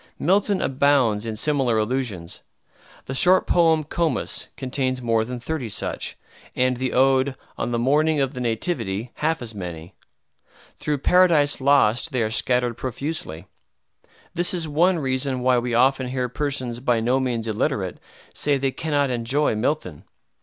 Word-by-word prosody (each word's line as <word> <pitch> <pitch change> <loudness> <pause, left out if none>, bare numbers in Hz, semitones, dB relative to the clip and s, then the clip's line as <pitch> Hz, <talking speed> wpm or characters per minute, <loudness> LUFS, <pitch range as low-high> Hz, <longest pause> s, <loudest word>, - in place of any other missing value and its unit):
Milton 195 +3 +1
abounds 130 -6 +2
in 110 - -3
similar 130 -1 +1
allusions. 105 -7 -2 0.6
The 135 - -5
short 180 +7 +4
poem 165 -3 +3
"Comus" 160 +2 -1
contains 130 -1 -1
more 115 -2 +1
than 125 +2 -6
thirty 130 -1 -4
such, - - -4 0.4
and 125 0 +1
the 130 0 -2
ode 135 +1 +3 0.2
"On - - -3
the 120 - -1
Morning 150 +5 +2
of 135 0 0
the 125 - -6
Nativity" 115 - -2
half 160 -3 -1
as 115 -2 -6
many. 85 -4 -7 0.8
Through 150 -1 -2
"Paradise 160 -3 +3
Lost" 135 0 +3
they 125 -3 +1
are 110 - -2
scattered 125 0 0
profusely. 130 - -5 0.9
This 175 +1 0
is 165 -3 -2
one 170 +5 +2
reason 130 -2 -1
why 125 0 +3
we 120 -1 -2
often 130 +1 +3
hear 125 0 -2
persons 130 -3 -2
by 120 -2 +1
no 125 +4 +1
means 120 -4 -2
illiterate 110 - -2 0.3
say 145 - +1
that 135 - 0
they 135 -1 +1
cannot 145 -2 0
enjoy 125 +5 0
Milton. 110 - -2
130 Hz, 155 wpm, -23 LUFS, 115-145 Hz, 0.9 s, short